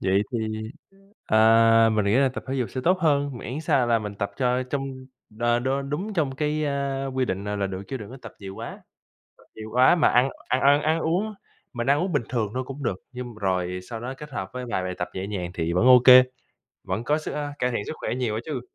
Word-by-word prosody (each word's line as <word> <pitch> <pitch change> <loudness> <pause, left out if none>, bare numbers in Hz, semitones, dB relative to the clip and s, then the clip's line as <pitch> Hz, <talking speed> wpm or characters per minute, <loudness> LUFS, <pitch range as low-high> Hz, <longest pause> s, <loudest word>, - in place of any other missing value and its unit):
Vậy 95 +2 +2
thì, 110 -2 -1 0.8
à, 115 +1 +5
mình 105 -2 +1
nghĩ 100 +2 +2
là 135 0 +4
tập 130 - -7
thể 135 - -2
dục 125 -6 -2
sẽ 130 - -4
tốt 185 +1 +3
hơn, 145 -5 +1
miễn 130 +8 -5
sao 135 -5 +2
là 115 -1 +3
mình 105 -1 -6
tập 100 0 -3
cho 125 -1 +1
trong, 135 +1 -4 0.5
ờ, 120 0 +3
đ 125 - -2 0.2
đúng 185 +9 -3
trong 145 -7 0
cái, 150 +1 -1
a, 140 -1 -2
quy 130 -1 -1
định 95 -2 -3
là 105 0 -3
là 100 - 0
được 95 0 -5
chứ 135 - -3
đừng 105 -1 -9
có 130 - -9
tập - - -9
nhiều 95 0 -8
quá. - - -8 0.6
Tập - - -21
nhiều 110 0 -8
quá 130 +7 +6
mà 160 - +4
ăn 125 +2 +3 0.2
ăn 130 - +1
ăn 145 +1 +5
ăn 160 +2 +1
uống, 185 +7 -1 0.4
mình 120 +1 -2
ăn 145 +1 +4
uống 185 - -1
bình 145 - +1
thường 110 -5 -1
thôi 130 0 -2
cũng 140 +1 -7
được, 95 -6 -1
nhưng 125 -2 -7
rồi 90 -3 -1
sau 115 -2 -5
đó 125 +3 -5
kết 150 0 -9
hợp 95 -6 -4
với 125 0 -5
vài 95 - -1
bài 90 0 -3
tập 90 - -3
nhẹ 95 +1 -4
nhàng 90 -4 -4
thì 85 -2 -2
vẫn 90 +7 +2
ô 125 -1 +9
kê, 130 0 +10 0.6
vẫn 95 +5 -3
có 150 +5 +1
sức 155 - -5
ờ, 145 -1 -3
cải 125 0 +1
thiện 105 -4 -2
sức - - -4
khỏe - - -2
nhiều 120 -4 -1
đó - - -1
chứ. 145 -6 -4
125 Hz, 255 wpm, -25 LUFS, 105-140 Hz, 0.8 s, kê